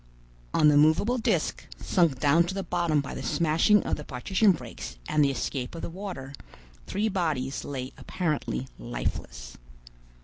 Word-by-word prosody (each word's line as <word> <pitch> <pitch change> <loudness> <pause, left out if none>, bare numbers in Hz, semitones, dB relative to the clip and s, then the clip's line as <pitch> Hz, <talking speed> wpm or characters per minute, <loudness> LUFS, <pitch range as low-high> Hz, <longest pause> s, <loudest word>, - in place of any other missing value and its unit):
On 155 - +4
the 145 - +5
movable 195 +12 +4
disc, - - 0 0.2
sunk 165 -9 +2
down 150 +4 +5
to 185 +2 -4
the 195 - -2
bottom 170 -4 +1
by 140 - -7
the - - -5
smashing 170 +6 +3
of - - -1
the 150 - -7
partition 190 - +2
breaks 125 - -6
and 150 -1 +3
the 140 - +4
escape 135 0 -3
of 165 - -7
the - - -4
water, 175 -8 -7 0.5
three 210 +3 0
bodies 155 -9 -1
lay 130 -2 -5
apparently 150 - -2
lifeless. - - -5
155 Hz, 160 wpm, -27 LUFS, 135-180 Hz, 0.5 s, the